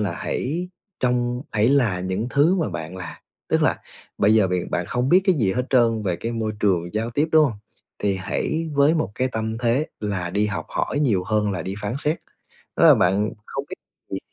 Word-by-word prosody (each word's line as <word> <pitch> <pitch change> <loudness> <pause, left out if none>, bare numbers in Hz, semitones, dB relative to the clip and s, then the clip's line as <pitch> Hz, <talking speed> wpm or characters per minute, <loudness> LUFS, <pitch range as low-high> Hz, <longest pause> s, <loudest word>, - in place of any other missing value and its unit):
là 105 - -1
hãy 170 +7 -3 0.3
trong 125 0 0
hãy 110 +2 +3
là 120 -10 +2
những 95 +4 -2
thứ 155 +6 +4
mà 165 - 0
bạn 80 +3 -6
là. 90 -3 -8 0.3
Tức - - +2
là - - +2 0.4
bây 105 +2 +4
giờ 105 -4 +4
b - - -3 0.2
bạn 85 0 -1
không 125 +1 -1
biết 180 +5 +6
cái 190 - +4
gì 110 - +1
hết 125 - 0
trơn 115 -4 +3
về 90 -4 -1
cái 115 +6 -4
môi 110 -2 -2
trường 90 -4 +1
giao 115 +2 -1
tiếp, 145 +7 0
đúng 155 -1 +7
hông? 115 -8 -2 0.4
Thì 100 -1 0
hãy 155 +12 -2
với 140 +3 +4
một 105 - -1
cái 130 +3 0
tâm 110 0 -2
thế 125 +5 +1
là 95 -5 -2
đi 105 +3 +1
học 100 -2 -4
hỏi 145 - -2
nhiều 105 -11 +2
hơn 105 0 +1
là 90 -4 -3
đi 95 +3 -4
phán 105 +2 -3
xét. 150 +3 -1 0.6
Đó - - +4
là - - +9
bạn 100 +4 +2 0.2
không - - -4
biết - - -5 0.4
gì, - - -2
110 Hz, 220 wpm, -23 LUFS, 100-135 Hz, 0.6 s, là